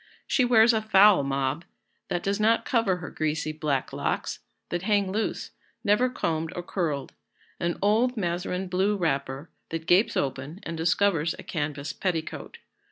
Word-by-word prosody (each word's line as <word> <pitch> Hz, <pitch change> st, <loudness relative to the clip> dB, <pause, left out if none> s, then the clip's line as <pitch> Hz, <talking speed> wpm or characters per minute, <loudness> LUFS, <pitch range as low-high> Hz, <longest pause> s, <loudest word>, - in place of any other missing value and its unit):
She 260 Hz, -, +2 dB
wears 235 Hz, -1 st, +6 dB
a 220 Hz, -, +1 dB
foul 205 Hz, -4 st, +6 dB
mob, 140 Hz, +3 st, -1 dB, 0.4 s
that 175 Hz, -, -2 dB
does 200 Hz, +1 st, 0 dB
not 225 Hz, +2 st, +3 dB
cover 225 Hz, -6 st, +2 dB
her 180 Hz, -, -8 dB
greasy 155 Hz, 0 st, -1 dB
black 150 Hz, -3 st, -2 dB
locks, -, -, -2 dB, 0.3 s
that 175 Hz, -, -2 dB
hang 200 Hz, -1 st, +1 dB
loose, 220 Hz, +3 st, -2 dB, 0.3 s
never 210 Hz, +5 st, +3 dB
combed 160 Hz, -8 st, -2 dB
or 175 Hz, -, -4 dB
curled; 160 Hz, -7 st, -2 dB, 0.5 s
an 170 Hz, 0 st, -1 dB
old 230 Hz, +5 st, +2 dB
mazarine 180 Hz, 0 st, -2 dB
blue 190 Hz, +3 st, +1 dB
wrapper, 140 Hz, -3 st, -2 dB, 0.2 s
that 165 Hz, 0 st, -4 dB
gapes 180 Hz, +6 st, +3 dB
open 135 Hz, +5 st, -3 dB
and 165 Hz, -, -5 dB
discovers 165 Hz, 0 st, +1 dB
a -, -, -9 dB
canvas 145 Hz, -2 st, -3 dB
petticoat. 170 Hz, -4 st, -3 dB
175 Hz, 155 wpm, -26 LUFS, 155-205 Hz, 0.5 s, wears